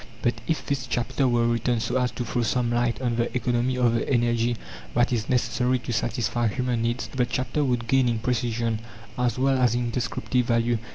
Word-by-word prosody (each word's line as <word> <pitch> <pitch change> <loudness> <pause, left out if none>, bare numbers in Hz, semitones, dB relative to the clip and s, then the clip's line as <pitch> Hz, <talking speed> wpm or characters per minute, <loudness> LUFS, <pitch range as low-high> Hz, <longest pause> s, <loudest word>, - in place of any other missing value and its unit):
But 120 - +3
if 160 - -1
this 135 -2 -2
chapter 130 +2 0
were 120 -1 +2
written 120 0 +1
so 120 - -1
as 125 0 +1
to 120 - -3
throw 120 +2 -1
some 120 +1 0
light 120 0 +1
on 120 -2 0
the 115 - 0
economy 125 +1 0
of 120 -2 +3
the 115 - -1
energy 120 -2 +2 0.4
that 120 +2 +3
is 115 0 -2
necessary 125 0 +1
to 120 -1 -5
satisfy 120 +1 0
human 125 +1 -1
needs, 120 +2 -1
the 130 -2 -1
chapter 130 +4 -1
would 125 -4 0
gain 130 0 +3
in 115 - 0
precision, 115 -1 -1 0.4
as 125 -2 0
well 135 0 +2
as 120 -2 +3
in 120 -1 -1
descriptive 125 +1 -1
value. 115 0 +2
120 Hz, 205 wpm, -25 LUFS, 115-125 Hz, 0.4 s, But